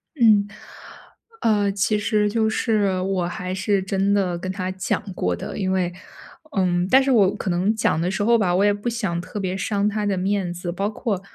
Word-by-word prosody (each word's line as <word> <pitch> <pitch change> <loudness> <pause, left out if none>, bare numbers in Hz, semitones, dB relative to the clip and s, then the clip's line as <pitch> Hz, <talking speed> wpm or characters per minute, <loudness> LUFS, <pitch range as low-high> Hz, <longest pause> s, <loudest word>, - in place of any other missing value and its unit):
嗯， 215 -5 +4 0.9
呃， 205 -3 +2
其 205 +2 +1
实 210 -1 +1
就 220 0 +1
是 205 -5 +1
我 185 -2 -1
还 180 +1 -4
是 190 +1 0
真 195 +1 0
的 185 -4 +1
跟 185 +2 -4
他 185 -1 -3
讲 185 0 -2
过 90 - -1
的。 - - -7
因 190 -2 -1
为 180 -2 0 0.6
嗯， 180 -1 +1
但 265 +1 +6
是 270 - +1
我 205 -4 +4
可 195 - -4
能 185 +5 +1
讲 190 -7 +1
的 180 - 0
时 205 +1 -1
候 235 +2 +4
吧， 180 -4 +1
我 200 +2 +3
也 205 - +4
不 205 +4 -3
想 200 -8 -2
特 205 - -7
别 185 -1 -2
伤 205 +1 0
他 210 0 -2
的 195 -2 0
面 190 -1 -1
子。 175 0 -5
包 195 +4 -2
括， 210 -3 -3
195 Hz, 220 characters per minute, -22 LUFS, 185-210 Hz, 0.9 s, 但